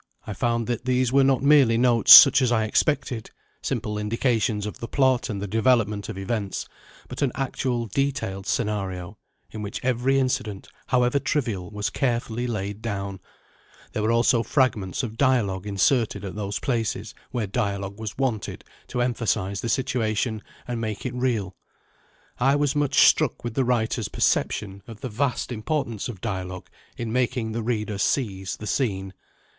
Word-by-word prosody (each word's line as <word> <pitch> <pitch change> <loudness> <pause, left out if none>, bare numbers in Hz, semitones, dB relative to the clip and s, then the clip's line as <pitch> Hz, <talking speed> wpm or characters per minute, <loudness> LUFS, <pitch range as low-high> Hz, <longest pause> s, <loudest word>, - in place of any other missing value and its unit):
I 105 - -5
found 115 +2 0
that 120 0 -3
these 130 -1 +1
were 135 0 +5
not 135 -1 +2
merely 140 -6 +5
notes 120 -2 +4
such 135 0 +11
as 125 -2 +2
I 110 -2 +2
expected 115 0 0 0.3
simple 110 -5 -2
indications 110 -1 0
of 105 - -6
the 115 - -5
plot 130 -2 +2
and 105 -2 -3
the 100 - -3
development 110 -2 +1
of 105 - -6
events, 100 0 -3 0.4
but 125 - -7
an 140 -3 +2
actual 130 -3 -2
detailed 115 -5 -2
scenario, 95 -5 -2 0.3
in 110 - -6
which 105 0 -5
every 130 +2 +2
incident, 110 -7 -1 0.2
however 125 +1 +2
trivial, 115 - -2
was 105 -1 -3
carefully 120 -1 -1
laid 105 -2 -4
down: 100 -3 -4 0.7
there 110 - -1
were 110 +2 +1
also 115 0 +3
fragments 115 -5 0
of 115 -2 -5
dialogue 105 -8 +1
inserted 105 +3 +1
at 95 - -5
those 100 -1 -3
places 115 -5 -2 0.2
where 120 -3 -2
dialogue 100 -1 -3
was 110 -1 -6
wanted 125 -6 -2 0.2
to 125 - -1
emphasise 105 -5 -1
the 115 - -3
situation 115 -4 -1 0.3
and 120 -2 -3
make 110 0 -4
it 125 - -3
real. 115 -7 -1 0.8
I 135 +3 +3
was 145 -1 +1
much 145 -1 +4
struck 155 -6 +2
with 120 -2 -4
the 130 +1 +1
writer's 115 -3 0
perception 100 -1 0
of 115 -2 -11
the 130 - -4
vast 125 +4 -1
importance 120 -2 -2
of 100 -6 -8
dialogue 95 -4 -5 0.3
in 115 -2 -4
making 125 -2 0
the 115 +1 -3
reader 110 -3 -2
seize 95 -7 -1
the 105 - -8
scene. 95 -4 -1
115 Hz, 160 wpm, -24 LUFS, 105-125 Hz, 0.8 s, such